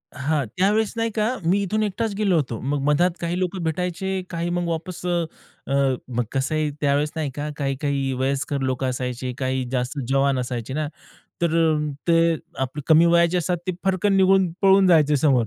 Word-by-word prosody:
हां. 145 +1 0
त्यावेळेस 210 +3 +2
नाही 230 0 0
का 215 -1 +1 0.2
मी 190 +4 +3
इथून 215 +3 0
एकटाच 215 +1 -2
गेलो 195 -3 +2
होतो, 125 -7 -1
मग 140 +2 -1
मधात 160 +5 +3
काही 170 +1 -2
लोक 185 +1 -2
भेटायचे 180 +3 -2
काही 170 0 -3
मग 175 0 -1
वापस 170 +2 -4
अ, 175 -1 +1 0.8
मग 120 -1 -1
कसं 135 +3 -1
आहे 155 -1 0
त्यावेळेस 145 +1 +1
नाही 155 -3 -2
का? 145 +3 -4
काही-काही 140 -1 -1
वयस्कर 135 +1 -1
लोकं 130 0 -1
असायचे, 125 0 -3
काही 130 -1 -1
जास्त 125 +3 -2
जवान 135 0 +2
असायचे 125 0 -4
ना. 155 +1 -1 0.6
तर 170 - +3 0.6
ते 165 0 +4 0.3
आपले 135 +3 -3
कमी 160 +1 +6
वयाचे 170 +1 +4
असतात 175 +1 0
ते 185 - 0
फरकन 190 +1 +2
निघून, 190 -1 +4
पळून 195 0 +6
जायचे 155 -4 +4
समोर. 130 -5 +3
160 Hz, 175 wpm, -23 LUFS, 135-180 Hz, 0.8 s, कमी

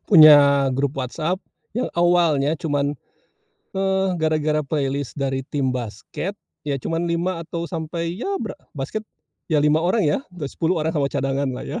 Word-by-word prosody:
punya 145 -6 +8
grup 140 0 0
WhatsApp 160 +8 -2 0.3
yang 245 +4 -1
awalnya 170 -5 +3
cuman, 145 -2 0 0.8
eee, 190 0 +1
gara-gara 155 -1 +1
playlist 140 -2 -2
dari 135 -1 -1
tim 135 -3 0
basket 125 - -5 0.3
ya 145 -2 -1
cuman 165 +5 -2
5 170 +1 -1
atau 170 +1 -4
sampai 165 0 -3
ya 390 - -2
bra 210 -4 -4 0.2
basket 145 +10 -4 0.5
ya 155 - +3
5 150 +1 +3
orang 185 +4 +2
ya, 150 - +2
dah 180 -4 -7
10 165 +5 -1
orang 160 +1 0
sama 140 -3 +1
cadanganlah 135 -1 -1
ya. - - -4
155 Hz, 155 wpm, -22 LUFS, 140-175 Hz, 0.8 s, punya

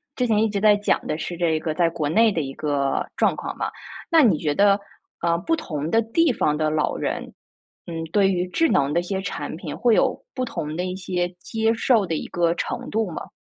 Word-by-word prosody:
之 250 - 0
前 215 -2 +3
一 220 - +2
直 200 -1 -2
在 210 -1 +6
讲 205 0 0
的 155 - -1
是 175 - -5
这 165 -2 +1
个 155 0 -2
在 170 +1 +2
国 160 -3 -2
内 220 +7 +4
的 170 - -1
一 135 -2 -5
个 140 -2 -1
状 - - +3
况 - - -6
嘛， - - -2 0.4
那 330 -1 +7
你 215 - +4
觉 150 -2 -1
得， 200 +4 +4 0.4
呃， 170 0 +2
不 330 - 0
同 155 - -4
的 225 +5 +3
地 275 +8 +2
方 150 -10 +1
的 155 0 +1
老 155 -1 0
人， - - -3 0.5
嗯， 165 -1 -4
对 195 -2 +4
于 180 -1 -1
智 325 - +1
能 140 0 +2
的 170 - +3
一 - - -3
些 190 +2 -3
产 190 - -5
品 165 -4 -6
会 235 -3 +3
有 - - +1
不 255 - -1
同 155 -9 -4
的 180 +2 -2
一 185 0 -3
些 180 -1 -2
接 225 +4 0
受 225 -2 +2
的 165 - -2
一 - - -4
个 170 -1 +1
程 - - -4
度 220 -2 0
吗？ - - -7
180 Hz, 255 characters per minute, -23 LUFS, 160-220 Hz, 0.5 s, 那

